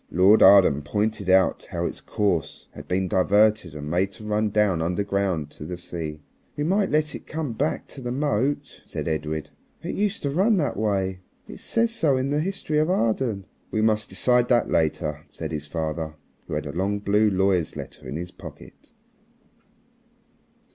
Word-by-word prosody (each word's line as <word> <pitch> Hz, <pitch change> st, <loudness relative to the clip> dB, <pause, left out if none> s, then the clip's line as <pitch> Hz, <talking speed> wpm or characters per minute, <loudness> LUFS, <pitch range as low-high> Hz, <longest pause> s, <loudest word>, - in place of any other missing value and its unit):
Lord 95 Hz, +4 st, +5 dB
Arden 95 Hz, -7 st, +7 dB
pointed 105 Hz, +4 st, -1 dB
out 95 Hz, 0 st, +3 dB
how -, -, -2 dB
its -, -, -4 dB
course 100 Hz, -8 st, -1 dB
had -, -, -11 dB
been 95 Hz, +1 st, 0 dB
diverted 100 Hz, -1 st, +3 dB
and 75 Hz, -1 st, -6 dB
made 95 Hz, +3 st, +1 dB
to 110 Hz, -, -12 dB
run 105 Hz, 0 st, 0 dB
down 100 Hz, -5 st, +2 dB
underground 90 Hz, -3 st, -1 dB
to -, -, -9 dB
the 90 Hz, +3 st, -5 dB
sea. 80 Hz, -3 st, -6 dB, 0.4 s
"We 145 Hz, -, -1 dB
might 195 Hz, +5 st, +2 dB
let 150 Hz, 0 st, +1 dB
it -, -, -9 dB
come 155 Hz, -6 st, -3 dB
back 145 Hz, +7 st, -1 dB
to 135 Hz, -, -9 dB
the 120 Hz, -1 st, -4 dB
moat," 140 Hz, +1 st, -1 dB
said -, -, -5 dB
Edred. 80 Hz, -1 st, -3 dB, 0.3 s
"It 170 Hz, -, -3 dB
used 205 Hz, 0 st, -1 dB
to 140 Hz, -, 0 dB
run 195 Hz, +8 st, +3 dB
that 145 Hz, -8 st, 0 dB
way. 95 Hz, -3 st, -1 dB, 0.3 s
It -, -, -10 dB
says 230 Hz, 0 st, 0 dB
so 155 Hz, -, +2 dB
in 130 Hz, +2 st, -1 dB
the 145 Hz, -, +1 dB
'History 155 Hz, -3 st, -1 dB
of 155 Hz, +2 st, +2 dB
Arden.'" 115 Hz, -, 0 dB, 0.2 s
"We 110 Hz, -, 0 dB
must 110 Hz, -1 st, +1 dB
decide 120 Hz, +6 st, +2 dB
that 120 Hz, -2 st, +3 dB
later," 75 Hz, -1 st, 0 dB
said -, -, -7 dB
his 75 Hz, -2 st, -4 dB
father, 80 Hz, 0 st, -3 dB, 0.3 s
who -, -, -3 dB
had -, -, -3 dB
a 70 Hz, -, -4 dB
long 95 Hz, +6 st, -1 dB
blue 105 Hz, +1 st, +2 dB
lawyer's 95 Hz, -4 st, +1 dB
letter -, -, -9 dB
in -, -, -5 dB
his 90 Hz, +2 st, -5 dB
pocket. 80 Hz, -6 st, -13 dB
100 Hz, 180 wpm, -24 LUFS, 85-130 Hz, 0.4 s, Arden